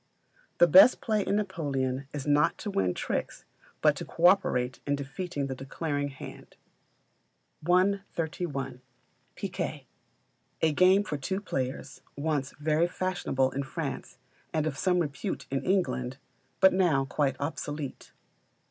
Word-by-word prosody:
The - - +7
best 285 - +8
play 215 -2 0
in 200 - 0
Napoleon 140 -10 -2
is 145 -2 -5
not 150 +2 +3
to 205 - -5
win 90 - 0
tricks, - - -3 0.4
but - - +5
to - - -4
co 170 - -1
operate 130 -10 +3
in 145 - +2
defeating 145 +2 -4
the 135 - -3
declaring 145 +2 -3
hand. 135 -1 -10 1.1
131. 170 -7 0 0.5
Picquet. - - -4 0.8
A 160 - +5
game 185 +5 +5
for 150 - -3
two 190 +8 -2
players, 130 -9 -4 0.2
once 145 -2 -1
very 155 +3 +2
fashionable 180 -8 -1
in 140 - -2
France 135 - -5 0.3
and 155 -1 0
of 155 -3 -2
some 180 +5 +1
repute 145 -6 -2
in 135 - 0
England; 155 -9 0 0.4
but 190 -1 +7
now 170 -8 +3
quite 135 0 0
obsolete. 145 -1 -5
150 Hz, 130 wpm, -29 LUFS, 135-180 Hz, 1.1 s, best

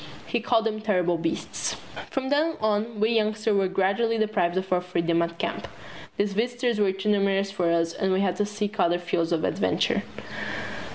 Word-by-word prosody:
He 240 - -1
called 230 -1 +2
them 215 -1 -1
terrible 180 -5 +1
beasts. 165 0 -2 0.3
From 265 -1 -2
then 310 +3 +2
on 215 +1 0
we 215 +2 +3
youngsters 215 -1 +1
were 195 -1 +3
gradually 195 +5 +1
deprived 210 -5 +1
of 185 0 0
our 180 - +2
freedom 170 -2 0
at 170 0 -2
camp. - - -3 0.5
These 200 0 +1
visitors 240 +1 0
were 200 -2 +3
too 195 +2 -2
numerous 195 -1 +2
for 180 -4 0
us 165 0 +1
and 190 - 0
we 190 +1 +2
had 185 -3 +1
to 210 - +1
seek 210 0 -4
other 175 -1 +3
fields 170 -1 -1
of 165 -2 +1
adventure. - - +1
200 Hz, 185 wpm, -26 LUFS, 180-220 Hz, 0.5 s, we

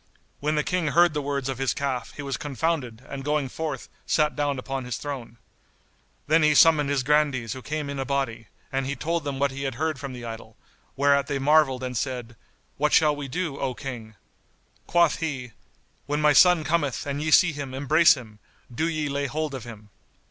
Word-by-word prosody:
When 150 +2 0
the 150 - +1
King 180 -1 -1
heard 170 +2 +4
the 150 - -1
words 140 -2 -2
of 135 -2 -3
his 135 -1 0
calf 135 -3 -3
he 145 - -6
was 140 -1 -2
confounded 140 -5 -3
and 135 -1 -6
going 150 -2 0
forth, 150 -2 -4 0.2
sat 150 -1 +2
down 145 -2 0
upon 135 +1 -4
his 125 -3 -4
throne. 130 -5 -6 0.9
Then 160 +2 +4
he 150 -1 +4
summoned 150 -2 +6
his 140 -2 +1
Grandees 140 -5 +1
who 130 - -8
came 150 +2 -4
in 140 -1 -5
a - - 0
body, 135 -5 -2 0.2
and 135 -1 -1
he 140 - -2
told 165 +1 -2
them 140 -2 -3
what 140 0 +1
he 135 +1 -6
had 135 -3 -3
heard 155 +1 -2
from 135 -1 -6
the 120 -1 -8
idol, 115 -1 -8 0.4
whereat 140 0 +3
they 145 - -1
marvelled 135 -2 +3
and 125 -1 -4
said, 120 -1 -3 0.4
"What 150 +1 +1
shall 150 -2 +5
we 145 -1 -6
do, 150 0 -3
O 130 -2 -2
King?" 120 -6 -7 0.7
Quoth 170 -3 +3
he, 130 -7 -4 0.6
"When 145 +1 -1
my 150 -1 +4
son 180 +1 +6
cometh 155 -4 0
and 140 0 -3
ye 155 - -1
see 180 +2 +6
him 140 -3 -6
embrace 155 +5 +5
him, 110 -5 -12 0.3
do 160 +7 0
ye 155 -2 -2
lay 140 0 -1
hold 155 +2 -3
of 130 -3 -6
him." 105 -3 -11
140 Hz, 205 wpm, -25 LUFS, 130-150 Hz, 0.9 s, summoned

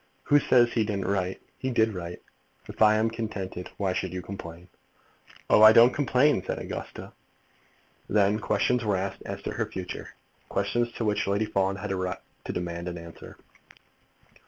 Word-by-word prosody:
"Who 145 - +5
says 120 -4 +4
he 115 - +2
didn't 100 -2 -2
write? 95 -2 -1 0.2
He 130 - -2
did 110 -3 +2
write. 90 -1 -7 0.4
If - - -10
I 110 0 +7
am 110 +1 +1
contented, 100 -5 -5
why 95 -2 0
should 90 -1 -3
you 90 -1 -5
complain?" 90 -3 -9 0.8
"Oh, - - +5
I 110 0 +10
don't 120 +3 +7
complain," 140 -5 +2
said - - -3
Augusta. - - -7 1.0
Then 105 +1 +3
questions 125 +2 +1
were 105 -3 +1
asked 95 +1 -4
as - - -6
to - - -3
the - - -1
future, 90 -1 -7 0.3
questions 120 0 0
to 115 - -3
which 105 -2 0
Lady 100 +2 +1
Fawn 95 -2 0
had 95 - -5
a - - 0
right 95 -1 -2 0.3
to - - -3
demand 85 0 -4
an 90 0 -4
answer. 85 0 -11
100 Hz, 175 wpm, -27 LUFS, 90-110 Hz, 1.0 s, I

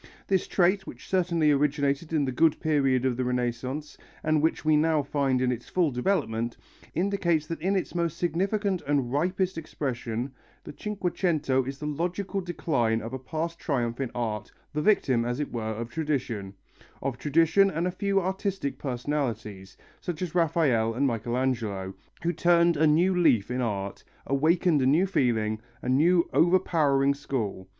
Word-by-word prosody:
This 190 -2 +1
trait, 190 +2 +2
which - - -10
certainly 170 -5 +2
originated 145 +1 +1
in 155 -3 +2
the 130 - -1
good 155 +4 +3
period 135 -5 +2
of 130 -2 +1
the 130 - 0
Renaissance 125 +4 -3 0.2
and 155 -1 +2
which 160 0 0
we 155 0 +4
now 155 -1 +3
find 135 -2 0
in 125 - +2
its 120 -1 -5
full 175 -5 +2
development, 120 - -1 0.4
indicates 175 -3 +1
that 165 0 -5
in 190 +4 +1
its 190 - -2
more 170 -1 +1
significant 185 +4 -1
and 135 -4 0
ripest 180 +3 0
expression 125 -5 -4 0.3
the - - -9
Cinquecento 175 -7 0
is 135 +1 -5
the 150 - -6
logical 180 +6 -2
decline 135 -10 0
of 115 +2 -7
a 130 - -3
past 165 +5 -4
triumph 120 -4 -1
in 130 - -1
art, 110 -4 -3 0.2
the 150 - -1
victim, 135 - +3
as 120 +3 -2
it 150 - -3
were, 120 - -2
of 115 +2 -5
tradition 125 -11 -2 0.5
of 135 -2 -2
tradition 165 +6 +4
and 165 0 -2
a 180 - 0
few 195 +2 0
artistic 190 -4 -2
personalities, 120 -7 -3 0.2
such 175 0 -4
as 175 -3 -4
Raphael 150 -10 +2
and 140 +3 +1
Michelangelo, 115 -5 -1 0.3
who 170 +1 +1
turned 170 0 +4
a 155 +1 +3
new 170 +5 +4
leaf 125 - +3
in 125 +1 -1
art, 100 -4 -3 0.2
awakened 155 +2 +2
a 130 - +3
new 160 +8 +4
feeling, 110 - 0 0.2
a - - -2
new 170 +6 +4
overpowering 155 -6 +3
school. 110 -9 -4
150 Hz, 165 wpm, -27 LUFS, 125-170 Hz, 0.5 s, we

